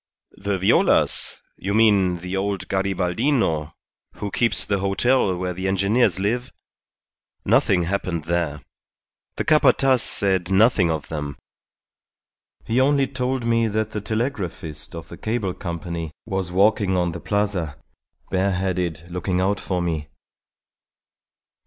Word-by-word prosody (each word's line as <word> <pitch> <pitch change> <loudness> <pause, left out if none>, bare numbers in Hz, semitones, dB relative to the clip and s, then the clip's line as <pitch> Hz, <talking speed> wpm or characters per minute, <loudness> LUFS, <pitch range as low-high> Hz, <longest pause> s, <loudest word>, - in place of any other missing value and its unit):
"The 100 0 -3
Violas? 95 +2 +2 0.2
You 100 +2 -2
mean 100 -5 +4
the 90 +2 -4
old 100 0 -2
Garibaldino 95 - 0 0.4
who 100 - -5
keeps 115 +3 +1
the 100 -1 0
hotel 100 +2 +2
where 90 0 -2
the 95 +2 -3
engineers 100 +6 +2
live? 115 +6 -1 0.9
Nothing 90 -3 +3
happened 85 -2 -2
there. 80 -2 -1 0.7
The - - -3
Capataz 135 -4 +4
said 95 -3 -1
nothing 95 -2 +4
of 80 -2 -2
them; 75 -4 -4 1.3
he 120 +3 +2
only 140 0 +3
told 130 -1 -2
me 115 -1 +2
that 110 0 -1
the 105 - -3
telegraphist 95 - -3
of 80 - -8
the - - -9
Cable 110 -4 -2
Company 85 -2 -5 0.2
was 95 -4 -2
walking 100 0 +3
on 90 -1 +1
the 85 - -6
Plaza, 100 -6 -1 0.5
bareheaded, 90 -3 0
looking 90 +1 -1
out 95 +2 +1
for 90 -2 -2
me. 80 -3 -2
95 Hz, 125 wpm, -23 LUFS, 90-110 Hz, 1.3 s, mean